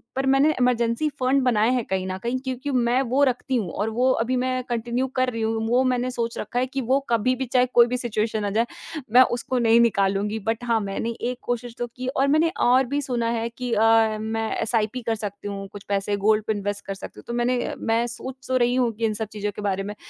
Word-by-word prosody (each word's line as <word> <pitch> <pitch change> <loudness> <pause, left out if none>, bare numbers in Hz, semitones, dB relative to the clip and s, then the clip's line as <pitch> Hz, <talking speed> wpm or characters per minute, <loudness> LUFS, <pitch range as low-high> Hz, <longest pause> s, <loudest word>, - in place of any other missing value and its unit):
पर 265 +1 -1
मैंने 280 +3 +4
emergency 245 +3 +1
fund 260 +2 +2
बनाए 230 -3 +3
हैं 250 -2 0
कहीं 190 -1 -1
न 185 0 -3
कहीं 240 +2 -1
क्योंकि 260 +2 -3
मैं 245 0 +2
वो 280 +2 +4
रखती 255 +1 -2
हूँ 215 -7 -1
और 210 +3 -2
वो 250 +4 +2
अभी 245 +1 0
मैं 255 0 -1
कंटिन्यू 240 +2 -1
कर 255 0 +2
रही 230 -2 -4
हूँ 225 0 -1
वो 250 +2 +3
मैंने 255 -1 0
सोच 235 -1 -3
रखा 240 +3 -2
है 255 - +2
कि 270 +1 -3
वो 260 +3 +2
कभी 235 +2 +2
भी 265 +1 -3
चाहे 250 0 +3
कोई 235 0 +7
भी 250 +1 -1
सिचुएशन 220 -3 -1
आ - - 0
जाए 220 +4 +1 0.5
मैं 250 - +9 0.2
उसको 255 +1 -2
नहीं 230 0 +5
निकालूँगी। 205 -1 +1
बट 225 +3 -2
हाँ, 230 -2 +2
मैंने 205 +3 -3
एक 250 +1 -2
कोशिश 245 -1 -4
तो 240 - -2
की 255 +2 -7
और 270 +1 +1
मैंने 310 +4 +3 0.2
और 260 +2 +5
भी 290 - +1
सुना 240 -4 -1
है 230 +1 -2
कि 245 +1 -6
अ, 225 0 +4
मैं 220 0 -2
एसआईपी 225 +1 0
कर 225 - +1
सकती 205 -1 -6
हूँ, 195 -1 -5
कुछ 200 0 -11
पैसे 200 0 0
गोल्ड 215 0 +4
पे 220 - +2
इन्वेस्ट 205 0 -3
कर 195 - -3
सकती 195 - -10
हूँ। - - -13
तो 235 - -4
मैंने 245 +1 0
मैं 230 +1 0
सोच 255 +2 -6
तो 260 - +2
रही 245 0 +2
हूँ 250 -2 +2
कि 225 +1 -2
इन 215 - 0
सब 220 +1 -3
चीज़ों 210 0 -2
के - - -6
बारे 195 -1 -1
में 205 +1 -6
235 Hz, 250 wpm, -24 LUFS, 220-255 Hz, 0.5 s, मैं